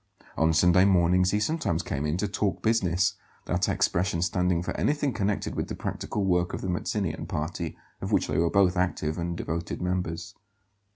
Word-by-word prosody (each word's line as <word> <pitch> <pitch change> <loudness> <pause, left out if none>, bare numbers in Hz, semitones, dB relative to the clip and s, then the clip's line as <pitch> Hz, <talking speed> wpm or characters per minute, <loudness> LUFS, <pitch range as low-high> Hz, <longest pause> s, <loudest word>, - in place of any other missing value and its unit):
On 80 +1 +3
Sunday 90 +3 +5
mornings 90 -1 +4
he 105 - +1
sometimes 105 - 0
came 70 +2 -2
in 75 +3 0
to 105 +3 0
"talk 95 -2 -1
business," 95 -5 +2 0.3
that - - 0
expression 85 -1 +1
standing 90 -1 +1
for - - -4
anything 145 -3 0
connected 100 0 -1
with - - -2
the - - -5
practical 105 -2 -3
work 90 -1 +1
of - - -6
the 95 - -3
Mazzinian 90 0 -2
party, 80 +1 -3 0.2
of - - -4
which - - +3
they 75 - -3
both 95 -1 +3
were 90 - +2
active 80 -3 -1
and 85 0 -3
devoted 85 +1 -3
members. 90 -1 -2
90 Hz, 180 wpm, -27 LUFS, 85-95 Hz, 0.3 s, Sunday